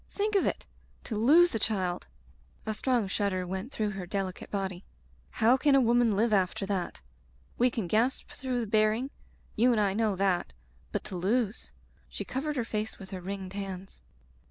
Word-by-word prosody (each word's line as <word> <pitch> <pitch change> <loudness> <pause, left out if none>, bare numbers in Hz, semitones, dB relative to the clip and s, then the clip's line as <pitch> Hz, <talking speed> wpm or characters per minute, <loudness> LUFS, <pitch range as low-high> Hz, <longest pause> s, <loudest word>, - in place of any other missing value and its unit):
Think 420 +1 -1
of 395 - +4
it! - - -2 0.4
To 225 - -4
lose 310 +11 +6
a 225 - 0
child 185 -6 -1 0.2
— - - -30
" - - -31
A 220 - -1
strong 240 -1 +1
shudder 190 -1 0
went 190 +7 -4
through 215 -5 -1
her 190 -3 -6
delicate 190 0 -3
body. 190 -3 -3 0.5
"How 235 +4 +4
can 285 +1 +4
a - - +7
woman 240 -3 +4
live 220 +2 +2
after 195 +1 +1
that? 195 -3 -3 0.6
We 250 +1 +5
can 225 -4 -3
gasp 225 +8 +1
through 260 -4 -2
the - - -2
bearing 215 +5 +2 0.2
— - - -32
you 245 +3 +4
and 230 - +2
I 200 -2 +2
know 215 -1 +1
that 185 - +1 0.2
— 65 0 -32
^but - - -2
to - - -7
lose 210 +5 0
— - - -33
" - - -33
She - - -5
covered 295 +3 -2
her 245 -4 -1
face 215 -1 -3
with 190 -1 -11
her 185 -2 -5
ringed 190 0 -5
hands. 195 - -6
215 Hz, 205 wpm, -29 LUFS, 190-240 Hz, 0.6 s, a